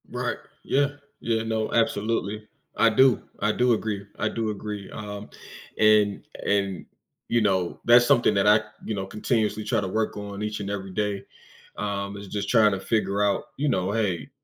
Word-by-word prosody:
Right. - - -2 0.3
Yeah. 140 +1 +2 0.3
Yeah, 115 -1 0
no, 110 -1 -1
absolutely. 110 -1 0 0.3
I 115 - +5
do. 130 +2 +4 0.2
I 105 +1 +2
do 125 +2 +3
agree, 105 -3 -2
I - - 0
do 115 -2 -2
agree, 105 -1 -5
um, 105 0 -7 0.5
and 105 -2 +4 0.2
and, 100 -2 0 0.4
you 120 - +2
know, 95 -4 0
that's 120 +1 +7
something 120 -2 +4
that 100 0 +2
I, 105 +1 +6 0.2
you 110 - -2
know, 95 -1 -3
continuously 105 +1 -1
try 110 0 +1
to 95 - -3
work 110 +3 -1
on 100 0 -6
each 105 0 -3
and 100 - -4
every 95 -1 -4
day, 100 0 -2 0.5
um, 100 -1 -3
is 100 0 -9
just 100 0 -3
trying 110 -3 +5
to 95 - -2
figure 100 -1 0
out, 100 -1 +1
you 150 - 0
know, 95 -2 0
"Hey, 105 -2 -1
105 Hz, 180 wpm, -25 LUFS, 100-110 Hz, 0.5 s, that's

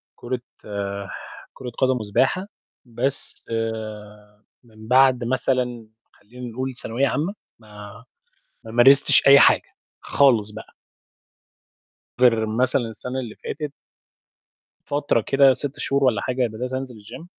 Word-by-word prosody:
كرة 125 0 -5 1.1
كرة 125 - -8
قدم، 130 -1 +1
وسباحة. 130 - 0 0.4
بس 125 +3 -3 1.2
من 110 -2 -16
بَعد 130 0 +4
مثلًا 125 -2 -1 0.3
خلّينا 120 +3 -11
نقول 130 +1 -4
ثانوية 125 +3 0
عامة، 160 +9 -2 0.3
ما 105 0 -13 0.6
ما 110 - -10
مارستش 135 +6 +6
أي 140 0 +9
حاجة، - - +3 0.3
خالص 115 -7 +2
بقى. 110 +1 -12 1.5
غير 115 -3 +4
مثلًا 125 +4 +1
السَنة 125 +4 -5
اللي 120 -4 -7
فاتت 150 -2 -6 1.2
من 145 - +1
فترة 145 -5 +1
كده 135 -1 +5
6 145 +2 -5
شهور 140 -1 0
والّا 115 -6 +2
حاجة 125 -1 -1
بدأت 120 +3 -6
أنزل 130 -2 -5
الgym، 110 +9 -11
125 Hz, 115 wpm, -22 LUFS, 115-135 Hz, 1.5 s, أي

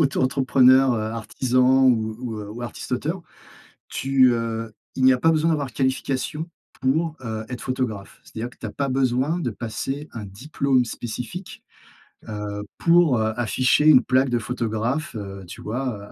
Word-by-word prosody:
auto-entrepreneur, 130 -2 +4
heu, 110 - -1
artisan 125 +4 +2
ou 110 -3 +2
ou 115 -4 -4
heu, 105 -1 -7
ou 120 +3 -7
artiste-auteur, 145 +8 -4 0.7
tu, 130 -2 +3
heu 115 -1 -3 0.2
il 130 - -1
n'y 130 - +8
a 125 - +1
pas 165 - +4
besoin 160 +1 +2
d'avoir 145 -4 0
de 125 - -14
qualification 135 +5 -1 0.3
pour, 155 +4 +1
heu, 110 -2 -4
être 125 - -6
photographe. 120 -6 -4
C'est-à-dire 115 +2 -6
que - - -21
tu - - -8
as 110 - -4
pas 140 -1 -2
besoin 130 +5 +1
de 140 -8 -1
passer 135 +7 -4
un 110 -3 -6
diplôme 130 +5 0
spécifique. 120 - -6 0.6
Heu, 105 -1 -5
pour, 170 -7 +4
heu, 110 0 0
afficher 130 +5 +2
une 130 -5 +8
plaque 130 +2 +2
de 120 - +1
photographe, 115 +4 -2
heu, 100 -2 -6
tu - - -10
vois? 125 +5 -3
Heu, 100 - -11
125 Hz, 170 wpm, -23 LUFS, 110-135 Hz, 0.7 s, n'y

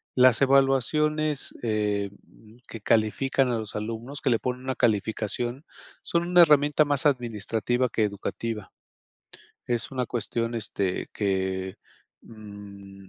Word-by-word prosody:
las 125 -1 +5
evaluaciones, 140 +2 +2
eh, 105 -3 -1
mm, 110 +1 -20
que 115 - -9
califican 120 +5 +1
a 120 - 0
los 110 -2 -7
alumnos, 115 +6 -5
que - - +1
le 115 - +2
ponen 125 0 -4
una 130 0 -2
calificación, 115 +3 -1 0.4
son 170 0 0
una 180 0 +6
herramienta 150 -1 +5
más 145 +1 +1
administrativa 120 -2 0
que 115 - -1
educativa, 105 +1 -4 1.0
es 120 -1 0
una 130 -2 -2
cuestión, 115 0 -2
este, 100 -4 -2
que, 95 -2 -2 0.5
mm, 100 -3 -12
115 Hz, 125 wpm, -26 LUFS, 105-135 Hz, 1.0 s, una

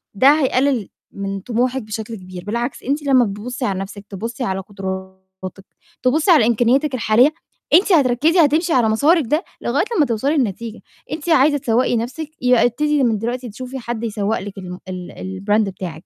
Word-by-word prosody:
ده 265 +7 +6
هيقلل 260 -5 +1 0.2
من 195 0 -4
طموحِك 245 +5 -1
بشكل 215 +1 -6
كبير، 185 -2 -10
بالعكس 235 +4 -3
أنتِ 285 +3 -1
لمّا 260 -3 +4
بتبُصي 235 +5 -4
على 190 -2 -1
نَفْسِك، 200 +1 -7
تبُصي 230 +6 -5
على 190 -3 -1
قدراتِك، 190 -1 -7 0.8
تبُصي 305 +8 +3
على 265 -9 +6
إمكانياتِك 250 +4 +2
الحالية، 240 +5 +4 0.4
أنتِ 390 +2 +5
هتركّزي 295 +4 +3
هتمشي 320 +4 +1
على 235 -4 +3
مسارِك 295 +9 +3
ده 305 - +1 0.2
لغاية 280 - 0
لمّا 300 - +4
توصلي 270 +6 0
لنتيجة، 230 -1 -2 0.3
أنتِ 310 +2 -4
عايزة 290 -1 +4
تسوَّقي 240 -1 +1
نَفْسِك؟ 255 +7 -4
يبقى 250 -1 +4
ابتدي 295 +4 +1
من 225 -4 +2
دلوقتي 245 +2 -3
تشوفي 255 +4 -7
حد 235 -1 -5
يسوَّق 215 -1 -1
لِك 200 0 -8
الم 180 -1 -8
ال 180 -1 -6 0.3
الBrand 210 +1 +3
بتاعِك، 175 -3 -8
240 Hz, 170 wpm, -20 LUFS, 205-275 Hz, 0.8 s, ده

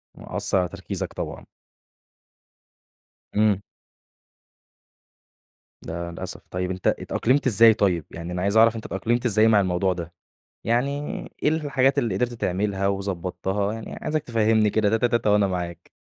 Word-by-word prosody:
وأثّر - - -1
على 90 -1 +1
تركيزَك - - -5
طبعًا. - - -6 1.9
امم. 105 -2 +3 2.2
ده 85 +1 -5
للأسف، 85 - -6
طيب 90 0 -2
أنتَ 95 0 -3
اتأقلمت 135 +4 +1
إزاي 115 -1 +7
طيب؟ 90 -7 +1
يعني 85 +1 -7
أنا 90 - -2
عايز 100 +3 +1
أعرف 115 0 +6
أنتَ 110 - -7
اتأقلمت 120 +5 -1
إزاي 110 -1 +4
مع 110 -2 +5
الموضوع 95 0 +1
ده، 85 -1 -7 0.5
يعني 120 +4 +1 0.5
إيه - - +4
الحاجات 140 -4 +1
اللي 115 -5 +1
قدرت 120 +5 0
تعملها 100 -2 -1
وضبّطتها؟ 100 +1 -2
يعني 115 -1 -7
عايزَك 155 0 -1
تفهّمني 110 -2 +2
كده 105 0 +2
تاتا 115 +3 +2
تاتا 115 -2 +1
وأنا 105 -1 +4
معاك. 90 -2 -5
105 Hz, 140 wpm, -24 LUFS, 90-115 Hz, 2.2 s, إزاي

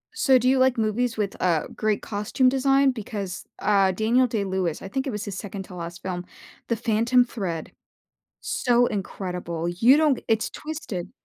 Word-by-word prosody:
So 265 - +4
do 250 - 0
you 260 0 +4
like 260 -1 +3
movies 225 +2 0
with 205 -2 -2
uh, 170 -4 +1
great 215 -1 0
costume 210 +5 0
design, 270 +1 +3
because 205 -5 -6
uh, 195 -2 +3
Daniel 230 +6 +2
Day 220 -4 -1
Lewis, 185 -4 -2
I - - -7
think 265 +6 -3
it - - 0
was 210 -3 -4
his 200 -3 -5
second 200 -2 -6
to 185 - -12
last 170 -1 -7
film, 180 -1 -4 0.4
The 235 - +1
Phantom 235 +2 +2
Thread. 185 -9 -4 0.7
So 245 -1 +2
incredible, 180 -5 -4
you 230 +11 +5
don't 300 -4 +4
g - - -11
it's 220 -1 +1
twisted. 295 - -6
215 Hz, 180 wpm, -25 LUFS, 190-250 Hz, 0.7 s, you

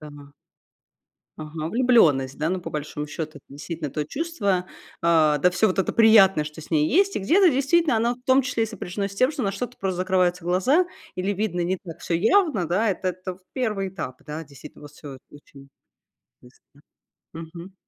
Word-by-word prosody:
да, 150 -1 -10
но 145 -1 -14 1.1
Ага, 155 0 -5
влюбленность, 165 - +3
да. 155 +2 0
Ну, 185 0 -1
по - - -8
большому 150 0 -5
счету, 155 +1 -6
это, - - -21
действительно, 150 +1 -6
то 150 - -2
чувство, 200 - -2 0.4
а, 160 -3 +4
да 180 +5 +3
всё 215 +4 +2
вот 185 - -2
это 190 - 0
приятное, 205 -7 +6
что 150 +1 -9
с 155 - -14
ней 155 -1 +3
есть, 395 +3 +2
и - - 0
где-то 350 - +4
действительно 285 +1 +2
оно, 235 +2 0
в 250 - -26
том 260 +1 +4
числе, 250 -3 -1
и - - 0
сопряжено 200 -2 -5
с 200 - -11
тем, 255 +7 +2
что 295 -4 -4
на 195 - 0
что-то 245 +5 -6
просто 190 -2 -3
закрываются 180 -1 +1
глаза, 225 - +2 0.3
или 185 +2 -1
видно 195 -3 -2
не 185 +2 -1
так 170 -3 -11
всё 170 - -2
явно. 225 - +2
Да, 210 +6 +1
это 185 -1 -2
то 185 0 -8 0.2
1 210 -7 -2
этап. 130 -9 -7
Да, 155 +2 -6
действительно 140 0 -14
вот 145 - -11
всё 145 -2 -11
очень 140 -1 -16 0.7
быстро. 130 +3 -22 0.5
Мгм. 170 +3 -10
185 Hz, 195 wpm, -24 LUFS, 155-225 Hz, 1.1 s, приятное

